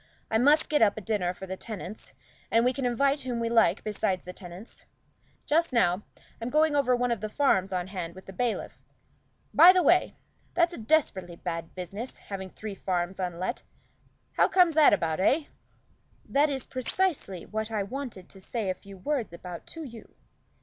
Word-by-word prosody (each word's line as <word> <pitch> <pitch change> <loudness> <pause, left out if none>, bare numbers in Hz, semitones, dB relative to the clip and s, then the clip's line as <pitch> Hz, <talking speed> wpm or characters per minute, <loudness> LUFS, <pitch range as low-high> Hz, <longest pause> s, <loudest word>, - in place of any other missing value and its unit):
I 220 - +3
must 295 +5 +5
get 300 - +2
up 215 -2 +4
a - - -4
dinner 200 -4 0
for 190 +1 -9
the 190 0 -5
tenants, 210 0 -8 0.4
and 230 +1 +3
we 250 - +3
can 265 -1 -1
invite 275 +4 +2
whom 245 -2 -3
we 230 0 -1
like 230 -1 +3
besides 195 -3 -1
the 180 - -7
tenants. 180 +3 -11 0.6
Just 330 +2 +2
now, 185 -6 +2 0.4
I'm 230 - -2
going 305 +1 +3
over 260 -3 +3
one 245 0 0
of 230 -4 -1
the 215 - -3
farms 195 -8 +2
on 180 -1 -1
hand 180 -3 -6
with 190 - -12
the 195 - -10
bailiff. 240 +3 -2 0.7
By 355 - +10
the 365 -1 +3
way, 350 +5 +4 0.4
that's 340 0 +3
a - - -7
desperately 215 - +1
bad 165 -2 -5
business, 195 +7 -6
having 190 -2 -7
three 210 +2 -7
farms 185 -1 -2
unlet 180 +5 -3 0.8
how - - +5
comes 360 -3 +4
that 310 -1 +7
about, 160 -1 +1
eh?" 275 - +3 0.8
"That 290 +2 +3
is 270 -3 -3
precisely 255 - -1
what 220 0 -3
I 215 -3 -1
wanted 230 -4 -6
to 195 - -14
say 210 -1 -2
a - - -1
few 195 +1 -13
words 245 - -2
about 175 0 -8
to 325 - -7
you. 235 -6 -11
220 Hz, 185 wpm, -28 LUFS, 185-275 Hz, 0.8 s, By